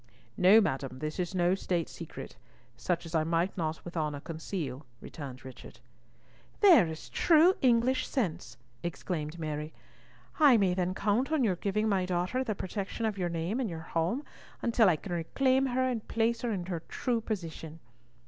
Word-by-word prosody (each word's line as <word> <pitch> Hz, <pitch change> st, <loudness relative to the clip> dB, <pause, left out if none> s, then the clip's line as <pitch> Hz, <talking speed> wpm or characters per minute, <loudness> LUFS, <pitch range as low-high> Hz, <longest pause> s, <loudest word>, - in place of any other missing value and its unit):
"No, 190 Hz, +4 st, +7 dB
madam, 135 Hz, -, -1 dB
this 155 Hz, +4 st, -4 dB
is 180 Hz, +1 st, -2 dB
no 175 Hz, 0 st, +3 dB
state 175 Hz, -3 st, -1 dB
secret; 150 Hz, -5 st, -9 dB, 0.4 s
such 170 Hz, +8 st, -2 dB
as 165 Hz, -, -9 dB
I 160 Hz, -1 st, +2 dB
might 170 Hz, +3 st, 0 dB
not 160 Hz, -3 st, -3 dB
with 175 Hz, -, -8 dB
honour 150 Hz, -3 st, -1 dB
conceal," 155 Hz, -3 st, -5 dB, 0.2 s
returned 135 Hz, -5 st, -9 dB
Richard. 130 Hz, -, -11 dB, 0.8 s
"There 355 Hz, -, +7 dB
is 160 Hz, -1 st, -7 dB
true 335 Hz, +2 st, +5 dB
English 255 Hz, +1 st, +3 dB
sense!" 180 Hz, -, -2 dB, 0.2 s
exclaimed 160 Hz, -1 st, -4 dB
Mary. 155 Hz, -1 st, -4 dB, 0.7 s
"I 285 Hz, -6 st, +7 dB
may 195 Hz, -4 st, +2 dB
then 180 Hz, 0 st, -1 dB
count 220 Hz, +9 st, +1 dB
on 310 Hz, -4 st, +2 dB
your 200 Hz, -6 st, +2 dB
giving 210 Hz, +3 st, 0 dB
my 190 Hz, -3 st, +1 dB
daughter 185 Hz, +8 st, 0 dB
the 215 Hz, -5 st, -2 dB
protection 200 Hz, +4 st, -4 dB
of 210 Hz, -3 st, -2 dB
your 175 Hz, -1 st, 0 dB
name 170 Hz, +8 st, -2 dB
and 245 Hz, -5 st, -1 dB
your 165 Hz, -2 st, -5 dB
home 170 Hz, -, -1 dB, 0.4 s
until 230 Hz, -3 st, +4 dB
I 170 Hz, -, +3 dB
can 180 Hz, +4 st, -8 dB
reclaim 260 Hz, +11 st, +1 dB
her 260 Hz, 0 st, 0 dB
and 245 Hz, -4 st, -2 dB
place 230 Hz, +1 st, 0 dB
her 240 Hz, -, -1 dB
in 185 Hz, -4 st, -3 dB
her 175 Hz, -2 st, -3 dB
true 240 Hz, -2 st, -1 dB
position. 165 Hz, -7 st, -5 dB
180 Hz, 175 wpm, -30 LUFS, 160-230 Hz, 0.8 s, No